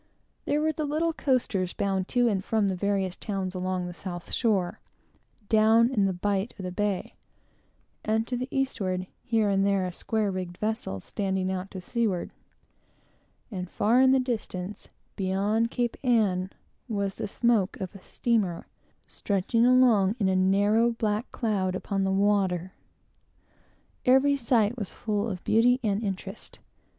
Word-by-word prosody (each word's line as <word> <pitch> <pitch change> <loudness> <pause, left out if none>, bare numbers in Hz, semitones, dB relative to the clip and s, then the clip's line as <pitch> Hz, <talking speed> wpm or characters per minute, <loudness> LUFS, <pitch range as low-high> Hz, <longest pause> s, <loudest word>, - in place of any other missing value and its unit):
There 290 +1 +1
were 315 +1 +2
the 310 0 -4
little 320 +3 0
coasters, 230 - 0
bound 195 -2 -1
to 245 -1 +2
and 195 -4 0
from 215 -2 +1
the 190 - -1
various 195 -1 -1
towns 195 -3 -4
along 185 -1 -2
the 175 - -6
south 175 -1 -7
shore, 195 -7 +1 0.7
down 220 +3 +5
in 210 -6 +2
the 195 - +1
bight 195 +4 -1
of 195 - -7
the 180 - -3
bay, 205 0 -2 0.9
and 220 +1 +1
to 250 - -3
the 250 +1 -3
eastward; 195 -9 -1 0.2
here 225 -4 +1
and 195 -1 +2
there 200 -1 +2
a 180 - -3
square 215 +3 -1
rigged 180 -2 -5
vessel 215 - -2
standing 190 - -2
out 190 +1 -4
to 190 -2 -7
seaward; 210 -3 -1 1.2
and, 180 -3 -5
far 235 +7 +3
in 260 0 +6
the 265 - +4
distance, 210 -6 -4 0.3
beyond 200 +4 0
Cape 240 -1 -1
Ann, 205 -7 +2 0.4
was 200 -3 -2
the - - -3
smoke 220 -2 +1
of 190 -3 -5
a 195 - -12
steamer, 210 -8 -1 0.4
stretching 210 +4 0
along 235 -6 +5
in 200 -5 +1
a 190 - +2
narrow, 205 +5 +3
black 215 +1 -2
cloud 195 -6 -1
upon 195 +1 -1
the 190 - +1
water. 190 -2 +1 1.3
Every 265 +3 +5
sight 235 -3 +1
was 205 - -4
full 210 0 -2
of 185 -3 -6
beauty 245 +3 +4
and 205 -1 0
interest. 195 -3 -6
205 Hz, 155 wpm, -27 LUFS, 190-230 Hz, 1.3 s, in